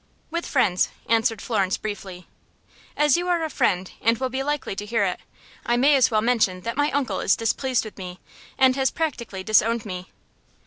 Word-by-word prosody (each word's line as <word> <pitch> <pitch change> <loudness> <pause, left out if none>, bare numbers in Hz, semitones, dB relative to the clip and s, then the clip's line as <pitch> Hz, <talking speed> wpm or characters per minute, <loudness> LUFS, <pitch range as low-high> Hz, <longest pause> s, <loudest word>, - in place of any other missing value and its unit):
"With 340 +1 -3
friends," 190 -10 +2 0.2
answered 225 -1 +1
Florence, 195 -5 0
briefly. 190 -4 -7 0.7
"As 295 +1 +4
you 350 +1 -2
are 345 -2 +1
a 315 - -3
friend 190 -8 0
and 230 +1 +3
will 260 +2 -2
be 260 +1 -2
likely 290 -7 -2
to 205 - -4
hear 225 -1 +1
it, 180 - -2 0.4
I 240 0 +1
may 280 +4 +5
as 260 -3 +4
well 215 -2 +1
mention 220 -6 +1
that 230 +4 -4
my 290 +1 +2
uncle 260 -9 -1
is - - +3
displeased 245 +2 0
with 215 - -10
me, 180 -1 -7 0.4
and 260 -1 +5
has 270 -1 +2
practically 235 -12 -4
disowned 220 +2 +2
me." 185 -2 -6
230 Hz, 190 wpm, -24 LUFS, 200-270 Hz, 0.7 s, may